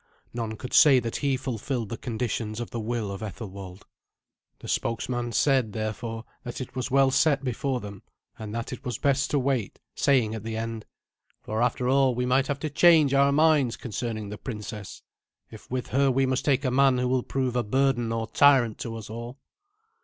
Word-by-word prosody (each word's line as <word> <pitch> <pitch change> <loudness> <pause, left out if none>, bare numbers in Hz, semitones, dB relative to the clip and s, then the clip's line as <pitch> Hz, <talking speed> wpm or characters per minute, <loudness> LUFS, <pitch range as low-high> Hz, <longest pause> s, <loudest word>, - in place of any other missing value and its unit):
None 115 -2 -3
could 125 - -8
say 140 -4 +7
that 115 -1 -3
he 140 -2 0
fulfilled 120 -2 -3
the 115 - -3
conditions 115 -2 -3
of 120 - -5
the 120 - -4
will 110 -2 -3
of 100 - -6
Ethelwald. 100 -2 -8 0.7
The - - -11
spokesman 120 +1 -2
said, 130 -2 +2
therefore, 110 +1 -4 0.2
that 120 - -6
it 130 - -7
was 130 0 -2
well 135 0 +4
set 140 0 +3
before 130 0 -2
them, 100 -1 -9 0.4
and 110 -1 -6
that 115 0 -4
it - - -9
was 125 -3 -3
best 140 -1 +1
to 145 - +1
wait, 130 -6 -1
saying 125 -6 +2
at 110 - -5
the 110 0 -4
end, 115 -1 -5 0.6
"For, 110 +1 -2
after 125 +1 0
all, 135 -1 +3
we 125 +1 -1
might 130 +2 +2
have 145 -1 -2
to 155 - -2
change 155 -3 +5
our 140 0 +4
minds 150 -4 +3
concerning 110 -3 -4
the 105 - -7
princess, 105 -4 -7 0.5
if 110 - -13
with 125 0 -3
her 135 +1 +3
we 135 +1 +2
must 130 +1 -1
take 140 -1 +2
a 130 - +1
man 135 0 +4
who 125 0 0
will 130 0 +1
prove 130 -1 -2
a 125 - +2
burden 120 0 +1
or 115 0 -1
tyrant 125 -1 +4
to 115 -1 -5
us 110 -1 -8
all." 120 +4 -7
125 Hz, 200 wpm, -26 LUFS, 110-135 Hz, 0.7 s, say